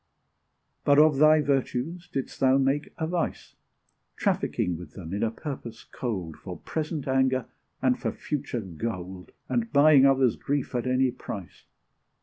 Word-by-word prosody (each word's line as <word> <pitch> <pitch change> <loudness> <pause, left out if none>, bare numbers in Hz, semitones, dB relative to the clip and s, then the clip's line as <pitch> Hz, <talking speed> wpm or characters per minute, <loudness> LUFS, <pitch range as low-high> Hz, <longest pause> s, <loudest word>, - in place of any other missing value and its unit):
But 145 0 +4
of 150 -1 +6
thy 155 0 +6
virtues 145 +4 -1
didst 135 - -4
thou 135 0 +4
make 135 +2 0
a 160 - -1
vice, 170 +1 -3 0.6
Trafficking 90 - 0
with 80 -2 -10
them 85 -2 -8
in 100 - -2
a 115 - +2
purpose 115 -1 -7
cold, 95 - -5
For - - -8
present 155 -2 -4
anger, 130 -1 +2 0.4
and - - +3
for - - -1
future 130 -5 -4
gold 95 -1 -6 0.2
And 235 -1 -1
buying 140 -1 +7
others' 135 -3 +3
grief 140 -1 -2
at 125 0 -1
any 130 0 +2
price. 95 -7 -8
130 Hz, 145 wpm, -27 LUFS, 115-145 Hz, 0.6 s, buying